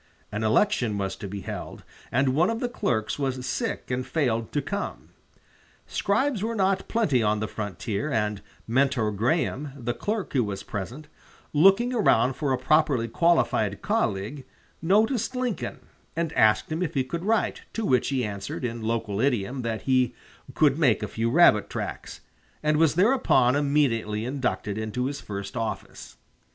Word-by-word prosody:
An 105 Hz, +1 st, -3 dB
election 110 Hz, -, +2 dB
was 95 Hz, -1 st, -2 dB
to 100 Hz, -, -6 dB
be 100 Hz, +1 st, -6 dB
held, -, -, -7 dB, 0.3 s
and 130 Hz, +1 st, +2 dB
one 165 Hz, +6 st, +3 dB
of 230 Hz, 0 st, -1 dB
the 245 Hz, -, -1 dB
clerks 145 Hz, -, -1 dB
was 130 Hz, -2 st, -2 dB
sick 125 Hz, -, -3 dB
and 125 Hz, +1 st, -1 dB
failed 125 Hz, -4 st, -1 dB
to 145 Hz, -, 0 dB
come. 200 Hz, +9 st, -4 dB, 0.8 s
Scribes 235 Hz, +2 st, 0 dB
were 230 Hz, +2 st, -2 dB
not 190 Hz, -2 st, +1 dB
plenty 165 Hz, -, +2 dB
on 105 Hz, -1 st, +1 dB
the 110 Hz, -, -2 dB
frontier, 105 Hz, -, -4 dB
and 105 Hz, -4 st, -1 dB, 0.3 s
Mentor 120 Hz, -2 st, +2 dB
Graham, 135 Hz, -, -1 dB
the 120 Hz, -2 st, -2 dB
clerk 210 Hz, -, -3 dB
who 130 Hz, -4 st, +3 dB
was 100 Hz, -2 st, -4 dB
present, 120 Hz, +10 st, -6 dB, 0.5 s
looking 195 Hz, +11 st, +5 dB
around 135 Hz, -, +3 dB
for 140 Hz, +1 st, -2 dB
a 130 Hz, -, +2 dB
properly 135 Hz, -2 st, +2 dB
qualified 170 Hz, +8 st, +1 dB
colleague, 105 Hz, +9 st, -1 dB, 0.4 s
noticed 220 Hz, -, +2 dB
Lincoln, 250 Hz, -4 st, -3 dB, 0.3 s
and 165 Hz, -1 st, -1 dB
asked 110 Hz, +7 st, +3 dB
him 160 Hz, +3 st, -2 dB
if 180 Hz, -, -2 dB
he 135 Hz, -, +2 dB
could 170 Hz, +6 st, -5 dB
write, 220 Hz, +2 st, +1 dB
to 225 Hz, -, -2 dB
which 125 Hz, -, +2 dB
he 130 Hz, -4 st, 0 dB
answered, 100 Hz, +4 st, -5 dB
in 115 Hz, -1 st, -4 dB
local 110 Hz, -2 st, -1 dB
idiom, 125 Hz, -1 st, 0 dB
that 115 Hz, -2 st, -3 dB
he 130 Hz, -2 st, +2 dB, 0.4 s
"could 150 Hz, -1 st, +3 dB
make 135 Hz, -7 st, +3 dB
a -, -, -2 dB
few 115 Hz, +3 st, -1 dB
rabbit 120 Hz, -, +5 dB
tracks," -, -, -6 dB, 0.4 s
and 150 Hz, 0 st, +2 dB
was 160 Hz, -2 st, +3 dB
thereupon 190 Hz, -, +4 dB
immediately 130 Hz, -7 st, +1 dB
inducted 115 Hz, -6 st, -2 dB
into 110 Hz, +3 st, -2 dB
his 140 Hz, +1 st, -3 dB
first 100 Hz, 0 st, -6 dB
office. 115 Hz, -2 st, -5 dB
130 Hz, 165 wpm, -26 LUFS, 110-165 Hz, 0.8 s, looking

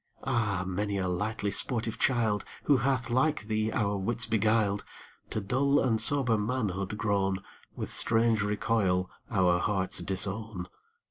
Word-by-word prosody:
Ah! 110 Hz, -8 st, 0 dB
many 100 Hz, +2 st, -2 dB
a 95 Hz, -1 st, -1 dB
lightly 100 Hz, +3 st, -2 dB
sportive 115 Hz, -1 st, -1 dB
child, 115 Hz, -5 st, +1 dB, 0.2 s
Who 145 Hz, -, +4 dB
hath 130 Hz, -1 st, 0 dB
like 130 Hz, 0 st, +2 dB
thee 110 Hz, 0 st, -1 dB
our 105 Hz, -4 st, 0 dB
wits 110 Hz, +4 st, +1 dB
beguiled, 110 Hz, -2 st, +1 dB, 0.5 s
To -, -, -1 dB
dull 135 Hz, +7 st, +2 dB
and 115 Hz, -4 st, +1 dB
sober 125 Hz, -3 st, +3 dB
manhood 105 Hz, -4 st, -2 dB
grown, 100 Hz, -2 st, 0 dB, 0.3 s
With -, -, -3 dB
strange 115 Hz, -1 st, +3 dB
recoil 105 Hz, -3 st, 0 dB, 0.2 s
our 90 Hz, -4 st, +3 dB
hearts 95 Hz, -1 st, -1 dB
disown. 95 Hz, +1 st, -2 dB
105 Hz, 135 wpm, -29 LUFS, 100-115 Hz, 0.5 s, Who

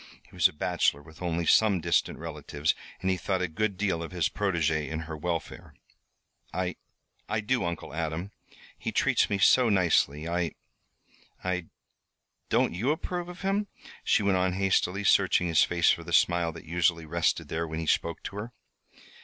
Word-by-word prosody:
He -, -, -24 dB
was -, -, +5 dB
a -, -, -10 dB
bachelor, 75 Hz, -2 st, 0 dB
with 80 Hz, +2 st, -16 dB
only 85 Hz, -1 st, -1 dB
some 100 Hz, +1 st, +4 dB
distant 85 Hz, 0 st, +1 dB
relatives, 75 Hz, +1 st, -2 dB, 0.3 s
and 95 Hz, -, +1 dB
he 95 Hz, -, 0 dB
thought 90 Hz, +1 st, -1 dB
a -, -, 0 dB
good 100 Hz, +4 st, -2 dB
deal 95 Hz, -5 st, 0 dB
of 85 Hz, -, -5 dB
his 85 Hz, -4 st, 0 dB
protegée 80 Hz, -6 st, 0 dB
and 80 Hz, 0 st, -3 dB
her 80 Hz, 0 st, -6 dB
welfare. 85 Hz, +1 st, -5 dB, 0.8 s
"I 90 Hz, -1 st, -2 dB, 0.5 s
I 105 Hz, +1 st, 0 dB
do, 115 Hz, +2 st, 0 dB
Uncle 85 Hz, -3 st, -4 dB
Adam. 80 Hz, +4 st, -3 dB, 0.5 s
He -, -, -3 dB
treats -, -, +2 dB
me 100 Hz, -, +1 dB
so 120 Hz, +5 st, +5 dB
nicely. 85 Hz, -6 st, +2 dB
I 85 Hz, -1 st, -1 dB, 0.9 s
I 90 Hz, -2 st, -2 dB, 0.8 s
don't -, -, +2 dB
you 105 Hz, +10 st, -1 dB
approve 175 Hz, +3 st, -2 dB
of 180 Hz, 0 st, -10 dB
him?" 200 Hz, +2 st, 0 dB, 0.4 s
she -, -, +3 dB
went 100 Hz, -2 st, +3 dB
on 90 Hz, 0 st, +1 dB
hastily, 95 Hz, 0 st, +1 dB
searching 90 Hz, -, +4 dB
his 80 Hz, -3 st, +4 dB
face 85 Hz, -1 st, +3 dB
for -, -, -2 dB
the -, -, -7 dB
smile 85 Hz, -1 st, +3 dB
that 80 Hz, -, -11 dB
usually 85 Hz, 0 st, +1 dB
rested 85 Hz, +2 st, 0 dB
there 85 Hz, +1 st, -2 dB
when 80 Hz, 0 st, -5 dB
he 80 Hz, -, -3 dB
spoke 85 Hz, +1 st, 0 dB
to 100 Hz, -, -6 dB
her. 115 Hz, +4 st, -6 dB
90 Hz, 180 wpm, -28 LUFS, 80-100 Hz, 0.9 s, was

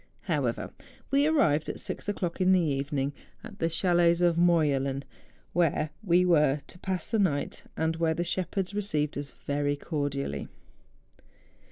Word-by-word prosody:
However, -, -, -1 dB, 0.4 s
we 280 Hz, +2 st, +4 dB
arrived 160 Hz, -, +2 dB
at -, -, -5 dB
six -, -, -5 dB
o'clock 180 Hz, -3 st, -2 dB
in 185 Hz, +1 st, +5 dB
the 185 Hz, -, +5 dB
evening 140 Hz, -2 st, -1 dB, 0.3 s
at 215 Hz, -3 st, -11 dB
the 165 Hz, -, +1 dB
chalets 170 Hz, 0 st, +3 dB
of 175 Hz, -1 st, +3 dB
Morjelen, 145 Hz, -6 st, +2 dB, 0.5 s
where 160 Hz, -3 st, +1 dB
we 180 Hz, -2 st, +4 dB
were 150 Hz, -5 st, +3 dB
to 175 Hz, -, -14 dB
pass 185 Hz, 0 st, -3 dB
the 225 Hz, -, +2 dB
night 145 Hz, -8 st, 0 dB
and 160 Hz, 0 st, 0 dB
where 165 Hz, -1 st, +1 dB
the 175 Hz, -, -1 dB
shepherds 185 Hz, +2 st, -2 dB
received 155 Hz, -8 st, -1 dB
us 140 Hz, 0 st, -6 dB
very 145 Hz, 0 st, 0 dB
cordially. 140 Hz, -, -3 dB
165 Hz, 150 wpm, -28 LUFS, 145-180 Hz, 0.5 s, in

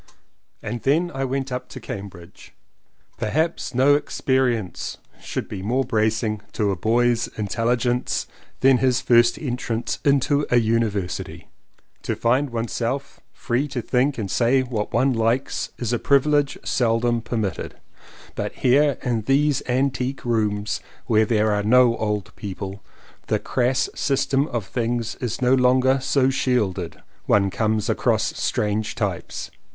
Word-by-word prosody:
And 115 Hz, +2 st, -4 dB
then 165 Hz, +6 st, +1 dB
I 135 Hz, 0 st, -2 dB
went 135 Hz, 0 st, -2 dB
up 125 Hz, 0 st, -4 dB
to -, -, -8 dB
Cambridge. 95 Hz, -2 st, -9 dB, 0.6 s
Per 110 Hz, -, -1 dB
haps 160 Hz, -1 st, -1 dB
no 135 Hz, +3 st, +5 dB
experience 130 Hz, -7 st, 0 dB, 0.2 s
should -, -, -4 dB
be 95 Hz, -, -6 dB
more 125 Hz, +7 st, 0 dB
bracing 110 Hz, -2 st, 0 dB
to 105 Hz, -3 st, +1 dB
a -, -, -1 dB
boy's 115 Hz, +4 st, +2 dB
intelligence 120 Hz, +4 st, 0 dB, 0.4 s
than 130 Hz, -1 st, +5 dB
his 130 Hz, -1 st, +2 dB
first 120 Hz, -1 st, +4 dB
entrance 120 Hz, -4 st, -3 dB
into 140 Hz, +1 st, +2 dB
a 125 Hz, -, +4 dB
University. 110 Hz, -5 st, -1 dB, 0.5 s
To -, -, -2 dB
find 130 Hz, +5 st, +1 dB
one's 115 Hz, -1 st, -3 dB
self 130 Hz, +4 st, -3 dB
free 125 Hz, +4 st, -1 dB
to 130 Hz, -3 st, -4 dB
think 135 Hz, +3 st, +1 dB
and 100 Hz, -5 st, -3 dB
say 130 Hz, +2 st, +3 dB
what 115 Hz, -5 st, -3 dB
one 135 Hz, 0 st, +2 dB
likes 115 Hz, +3 st, 0 dB
is 120 Hz, -1 st, -2 dB
a 120 Hz, -, 0 dB
privilege 145 Hz, 0 st, +2 dB
seldom 120 Hz, -1 st, +1 dB
per 120 Hz, +1 st, -4 dB
mitted, 105 Hz, -4 st, -3 dB, 0.6 s
but -, -, -4 dB
here 140 Hz, +2 st, +3 dB
in 120 Hz, -4 st, 0 dB
these 140 Hz, +4 st, +2 dB
antique 130 Hz, +1 st, -1 dB
rooms 105 Hz, -3 st, 0 dB, 0.3 s
where 110 Hz, -1 st, +3 dB
there 110 Hz, -1 st, +2 dB
are 105 Hz, 0 st, +1 dB
no 120 Hz, +2 st, +5 dB
old 105 Hz, -1 st, -3 dB
people, 100 Hz, -1 st, -7 dB, 0.4 s
the -, -, +2 dB
crass 125 Hz, +2 st, 0 dB
sys 135 Hz, -1 st, 0 dB
tem 140 Hz, +2 st, +1 dB
of 120 Hz, -8 st, -3 dB
things 115 Hz, +1 st, -2 dB
is 125 Hz, 0 st, -3 dB
no 125 Hz, +1 st, +4 dB
longer 130 Hz, +1 st, +4 dB
so 135 Hz, 0 st, +2 dB
shielded. 125 Hz, -8 st, -1 dB, 0.3 s
One 100 Hz, -1 st, +3 dB
comes 110 Hz, 0 st, 0 dB
across -, -, +1 dB
strange 105 Hz, 0 st, -1 dB
types. -, -, -4 dB
120 Hz, 145 wpm, -23 LUFS, 110-130 Hz, 0.6 s, no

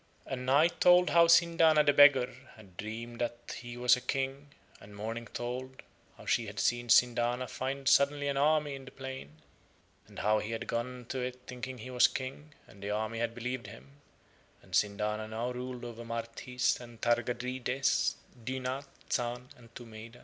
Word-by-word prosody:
And 130 Hz, -1 st, -5 dB
Night 160 Hz, +6 st, +3 dB
told 180 Hz, 0 st, +6 dB
how 170 Hz, 0 st, +6 dB
Sindana 165 Hz, -2 st, +5 dB
the 145 Hz, -1 st, +4 dB
beggar 140 Hz, -3 st, +6 dB, 0.2 s
had 100 Hz, -5 st, -16 dB
dreamed 115 Hz, +4 st, -6 dB
that 120 Hz, 0 st, -4 dB
he 120 Hz, 0 st, -8 dB
was 125 Hz, -1 st, +5 dB
a 125 Hz, -, -7 dB
King, 135 Hz, +2 st, -2 dB, 0.3 s
and 100 Hz, 0 st, -13 dB
Morning 115 Hz, +3 st, -5 dB
told 130 Hz, +2 st, -6 dB, 0.3 s
how -, -, -13 dB
she 115 Hz, -, +1 dB
had 100 Hz, +1 st, -6 dB
seen 120 Hz, 0 st, 0 dB
Sindana 120 Hz, +1 st, +3 dB
find 135 Hz, +2 st, -4 dB
suddenly 140 Hz, +1 st, +4 dB
an 140 Hz, -, 0 dB
army 150 Hz, +1 st, +2 dB
in 135 Hz, -1 st, -8 dB
the -, -, -9 dB
plain, 130 Hz, -, -9 dB, 0.6 s
and -, -, -15 dB
how 105 Hz, +1 st, +2 dB
he 105 Hz, +2 st, -4 dB
had 115 Hz, -, -4 dB
gone 125 Hz, +1 st, -4 dB
to 130 Hz, -, -3 dB
it 125 Hz, 0 st, -4 dB
thinking 125 Hz, +1 st, -6 dB
he 125 Hz, +3 st, -8 dB
was 125 Hz, 0 st, +6 dB
King 140 Hz, +3 st, -7 dB
and 100 Hz, -, -17 dB
the 100 Hz, -, -4 dB
army 110 Hz, +2 st, -2 dB
had 115 Hz, 0 st, -2 dB
believed 120 Hz, -1 st, -4 dB
him, 115 Hz, +6 st, -13 dB, 0.7 s
and -, -, -18 dB
Sindana 105 Hz, +1 st, 0 dB
now 115 Hz, +3 st, -3 dB
ruled 125 Hz, 0 st, -6 dB
over 120 Hz, 0 st, -7 dB
Marthis 115 Hz, +2 st, -2 dB
and 120 Hz, -2 st, -12 dB
Targadrides, 125 Hz, +2 st, 0 dB, 0.3 s
Dynath, 130 Hz, +2 st, -3 dB, 0.3 s
Zahn, 120 Hz, +1 st, -2 dB
and 115 Hz, -2 st, -18 dB
Tumeida. 115 Hz, 0 st, -10 dB
125 Hz, 170 wpm, -31 LUFS, 115-135 Hz, 0.7 s, told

